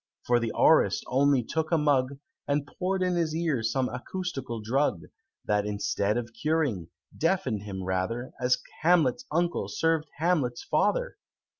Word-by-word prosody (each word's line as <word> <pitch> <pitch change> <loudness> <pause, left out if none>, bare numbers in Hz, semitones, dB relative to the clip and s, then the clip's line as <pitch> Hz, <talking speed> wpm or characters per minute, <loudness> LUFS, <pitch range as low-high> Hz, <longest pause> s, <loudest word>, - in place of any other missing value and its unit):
For 120 0 +3
the 115 -1 -2
Aurist - - +4
only 135 0 +3
took 160 +7 -2
a 165 - +4
mug, 140 -3 +1 0.3
And 145 0 0
pour'd 185 +5 -2
in 180 -1 +1
his 165 -2 0
ear 160 -7 0
some 125 +3 0
acoustical 135 -3 -5
drug, 110 - 0 0.4
That, 105 0 +1
instead 100 +1 0
of 120 -1 -4
curing, 135 - -1 0.3
deafen'd 165 - 0
him 95 -2 -6
rather, 95 +7 -2
As 125 0 +3 0.2
Hamlet's 160 -6 +3
uncle 170 +2 0
served 165 -1 0
Hamlet's 150 -7 0
father! - - 0
135 Hz, 145 wpm, -28 LUFS, 115-165 Hz, 0.4 s, Aurist